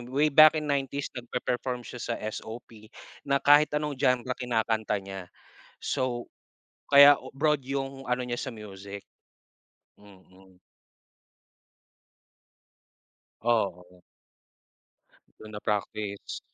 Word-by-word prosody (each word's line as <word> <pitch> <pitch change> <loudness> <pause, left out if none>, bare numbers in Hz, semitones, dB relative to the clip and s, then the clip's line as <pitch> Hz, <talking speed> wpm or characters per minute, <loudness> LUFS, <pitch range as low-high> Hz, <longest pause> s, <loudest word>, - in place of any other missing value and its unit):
Way 140 +5 +1
back 155 0 +8
in 150 - -4
'90s 140 0 -2
nagpe-perform 125 0 -3
siya 125 - -8
sa 115 - -2
SOP 110 0 -8 0.4
na 140 0 +3
kahit 145 +1 +6
anong 150 -1 -2
genre 125 0 +1
kinakanta 110 -4 -1
niya. 95 -2 -8 0.5
So, 130 -3 -2 0.6
kaya 140 0 +9 0.2
broad 150 -1 +2
yung 135 0 -4
ano 125 0 +1
niya 120 0 -3
sa 130 - -4
music. 100 -2 -9 1.0
Mm. 95 -2 -19 2.8
Oo. 90 -6 -1 1.4
Dun 110 - -11
na-practice. 105 -1 -4
120 Hz, 95 wpm, -27 LUFS, 105-135 Hz, 2.8 s, kaya